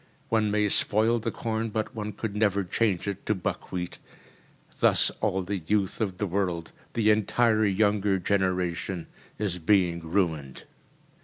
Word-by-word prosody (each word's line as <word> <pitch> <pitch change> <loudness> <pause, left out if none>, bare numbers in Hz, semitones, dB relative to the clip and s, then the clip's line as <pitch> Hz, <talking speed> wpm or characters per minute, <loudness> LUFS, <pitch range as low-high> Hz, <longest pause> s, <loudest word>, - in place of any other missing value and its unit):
One 110 -2 +2
may 105 0 +2
spoil 110 +3 +2
the 115 +1 -2
corn, 110 +1 -2
but 110 +2 -3
one 105 -2 -4
could 105 0 -4
never 100 -2 +2
change 100 0 0
it 100 -1 -4
to 105 - +2
buckwheat. 90 -1 -4 0.8
Thus - - +4
all 95 0 +1
the 100 +1 -3
youth 100 -1 0
of 95 -4 -1
the 105 - -1
world, 90 -3 -2 0.2
the 110 -2 +3
entire 110 +1 +3
younger 100 0 +2
generation, 90 -2 -1 0.3
is 95 -4 -2
being 90 -1 +3
ruined. 80 -6 -1
100 Hz, 145 wpm, -27 LUFS, 90-110 Hz, 0.8 s, Thus